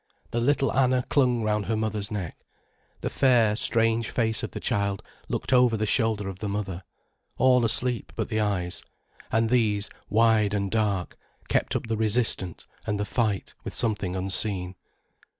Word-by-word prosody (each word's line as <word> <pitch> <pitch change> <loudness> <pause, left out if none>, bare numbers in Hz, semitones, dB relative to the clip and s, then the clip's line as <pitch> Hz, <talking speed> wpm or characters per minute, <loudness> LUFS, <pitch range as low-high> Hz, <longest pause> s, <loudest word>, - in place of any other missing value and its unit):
The 120 - 0
little 140 +1 +2
Anna 130 -1 +2
clung 125 -5 +2
round 105 -1 0
her 110 0 0
mother's 110 -1 -2
neck. 100 -7 -4 0.7
The - - -2
fair, 120 -5 +4
strange 115 0 +1
face 110 -2 0
of - - -3
the - - -6
child 100 -4 -1 0.3
looked - - -2
over 125 -3 +5
the 110 - 0
shoulder 110 -3 +1
of 95 -1 -6
the 105 - -3
mother, 100 -3 -3 0.6
all 125 -1 +4
asleep 120 +2 0
but - - -2
the 110 -2 -1
eyes, 100 -4 -1 0.5
and 115 +1 +2
these, 105 -4 +1 0.2
wide 110 -2 +3
and 100 -1 -1
dark, 105 -5 -1 0.3
kept - - +1
up - - -1
the 115 -1 -2
resistance 110 -5 0 0.2
and 105 -1 -1
the 105 - 0
fight 105 -2 -1
with - - -6
something 105 -5 -1
unseen. 95 0 -1
110 Hz, 165 wpm, -26 LUFS, 100-115 Hz, 0.7 s, over